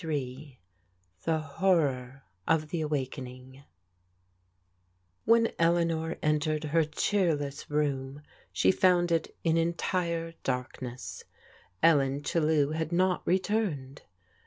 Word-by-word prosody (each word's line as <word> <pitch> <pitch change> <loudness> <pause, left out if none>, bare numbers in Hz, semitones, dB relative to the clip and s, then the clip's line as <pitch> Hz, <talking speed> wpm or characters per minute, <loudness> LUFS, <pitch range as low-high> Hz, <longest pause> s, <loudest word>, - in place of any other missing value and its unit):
«0f 165 - -6
II 135 -1 -4 0.7
THE 165 -1 +2
HORROR 140 -5 0 0.2
OF 155 -2 +2
THE 165 0 -2
AWAKENING 130 -2 -5 1.6
WHEN 230 0 +5
Eleaiior 165 -1 +1
entered 150 0 +1
her 160 +2 +2
dieericss 155 -3 -1
room 145 -1 -1 0.3
she - - +3
found 180 -2 +3
it 165 -1 0
in 165 -1 +2
entire 170 0 -1
darkness^ 125 -1 -4 0.6
EDcn 140 -4 +4
Chdkw 155 -3 +1
had 160 0 -2
not 180 +1 +2
returned. 180 -8 -1
155 Hz, 100 wpm, -29 LUFS, 140-170 Hz, 1.6 s, WHEN